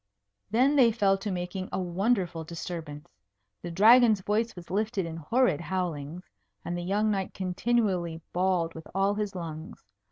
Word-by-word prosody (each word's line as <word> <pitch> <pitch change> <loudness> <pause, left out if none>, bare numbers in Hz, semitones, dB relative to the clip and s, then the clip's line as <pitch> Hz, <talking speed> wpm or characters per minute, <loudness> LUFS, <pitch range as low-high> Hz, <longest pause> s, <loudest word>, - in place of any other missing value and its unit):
Then 255 +7 +3
they 250 -5 +6
fell 205 -3 +2
to 205 - -4
making 185 0 -4
a - - -2
wonderful 180 -2 0
disturbance. 160 - -7 0.5
The - - -6
Dragon's 220 +4 +6
voice 220 +3 -1
was 175 -1 -11
lifted 210 -1 -1
in 165 -1 -6
horrid 170 - +1
howlings; 170 -2 -3 0.4
and 175 - -3
the 175 - -3
young 205 +4 +1
knight 195 -2 -3
continually 185 -3 0
bawled 180 -2 +1
with 160 - -10
all 195 +1 +2
his 210 -1 -3
lungs. 160 -2 -7
185 Hz, 155 wpm, -28 LUFS, 170-210 Hz, 0.5 s, they